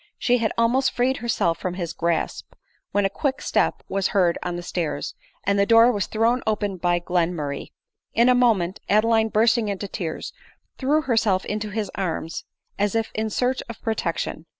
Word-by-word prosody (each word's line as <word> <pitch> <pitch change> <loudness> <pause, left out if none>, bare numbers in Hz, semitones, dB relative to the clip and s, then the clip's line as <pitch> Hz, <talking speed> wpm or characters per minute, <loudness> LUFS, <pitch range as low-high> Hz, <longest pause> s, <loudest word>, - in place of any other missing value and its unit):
she 245 0 +2
had 220 -2 0
almost 245 +3 +3
freed 255 +2 +1
herself 200 -8 0
from 180 -1 -3
his 170 -2 -4
grasp, 170 0 -2 0.4
when 205 0 +2
a - - +2
quick 270 +7 -2
step - - 0
was 195 -1 0
heard 180 -4 +2
on 180 -1 -3
the 175 - -5
stairs, 155 -5 -3 0.3
and 200 +1 +1
the 200 - +4
door 230 +1 +7
was 205 -6 -1
thrown 230 +3 +1
open 205 -2 0
by 175 -1 +1
Glenmurray. 170 -5 -1 0.5
In 235 +1 +5
a 250 - +6
moment, 215 -8 +2
Adeline 220 +2 +4
bursting 220 +1 +3
into 200 0 -3
tears, 165 -5 -5 0.5
threw 290 +4 +2
herself 220 -7 +1
into 210 0 -3
his 205 -1 -3
arms, 165 -3 -3 0.3
as 205 +1 +1
if 225 -1 0
in 220 0 -1
search 250 +4 0
of 235 - -7
protection. 170 -6 -2
205 Hz, 175 wpm, -23 LUFS, 180-230 Hz, 0.5 s, door